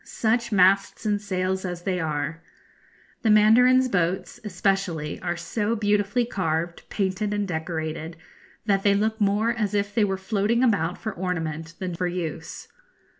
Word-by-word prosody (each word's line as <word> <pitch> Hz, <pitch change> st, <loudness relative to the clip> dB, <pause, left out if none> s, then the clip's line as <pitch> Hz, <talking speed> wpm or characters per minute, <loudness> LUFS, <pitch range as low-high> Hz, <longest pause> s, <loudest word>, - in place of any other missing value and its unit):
Such 235 Hz, +1 st, 0 dB
masts 195 Hz, +2 st, +3 dB
and 205 Hz, -1 st, +1 dB
sails 190 Hz, -2 st, -1 dB
as 175 Hz, -2 st, -5 dB
they 185 Hz, -1 st, -1 dB
are! 155 Hz, 0 st, -2 dB, 0.8 s
The 225 Hz, -, +1 dB
mandarins' 250 Hz, +5 st, +6 dB
boats, 180 Hz, -4 st, -1 dB
especially, 185 Hz, -6 st, -1 dB
are 175 Hz, -1 st, -2 dB
so 210 Hz, +6 st, -1 dB
beautifully 210 Hz, +2 st, +1 dB
carved, 170 Hz, -5 st, -2 dB
painted, 200 Hz, +1 st, -1 dB
and 205 Hz, -1 st, -1 dB
decorated, 160 Hz, -1 st, -4 dB, 0.5 s
that 200 Hz, -2 st, +2 dB
they 200 Hz, 0 st, +3 dB
look 220 Hz, +2 st, 0 dB
more 205 Hz, +3 st, +2 dB
as 215 Hz, -3 st, -1 dB
if 205 Hz, 0 st, -1 dB
they 220 Hz, -, +3 dB
were 195 Hz, -2 st, 0 dB
floating 210 Hz, +5 st, 0 dB
about 185 Hz, -8 st, +1 dB
for 220 Hz, -2 st, -5 dB
ornament 165 Hz, -3 st, -4 dB
than 185 Hz, -2 st, -4 dB
for 180 Hz, +1 st, -1 dB
use. 165 Hz, -3 st, -5 dB
195 Hz, 150 wpm, -25 LUFS, 175-210 Hz, 0.8 s, mandarins